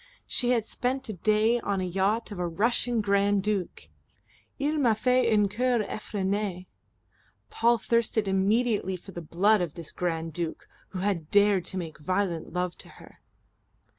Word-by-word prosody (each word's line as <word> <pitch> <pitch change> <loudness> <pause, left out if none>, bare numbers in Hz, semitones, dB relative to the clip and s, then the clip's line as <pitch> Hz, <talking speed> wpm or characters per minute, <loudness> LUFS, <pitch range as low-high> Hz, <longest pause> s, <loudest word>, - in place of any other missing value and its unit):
She 245 - -1
had 235 -3 +2
spent 260 +3 -2
a - - -2
day 215 +5 +2
on 200 -3 -2
the 185 - -1
yacht 195 +6 0
of 200 - -6
a 175 - 0
Russian 230 +6 +1
Grand 200 -1 +2
Duke. 205 -4 -2 0.7
"Il 295 +2 0
m'a 235 -6 +3
fait 250 +1 +2
une 210 -2 +4
cour 240 +2 +1
effrenee" 200 -3 -3 0.9
Paul 235 +1 +3
thirsted 225 -1 +1
immediately 200 +1 +1
for 180 +2 -11
the 175 - -7
blood 190 +6 +2
of 170 -4 -3
this 170 -3 -8
Grand 165 -2 -3
Duke, 170 0 -4 0.2
who 185 - -6
had 185 -6 -1
dared 205 -3 +4
to 190 - -4
make 160 -4 -6
violent 180 0 -1
love 180 0 -2
to - - -11
her. - - -16
205 Hz, 165 wpm, -27 LUFS, 180-225 Hz, 0.9 s, une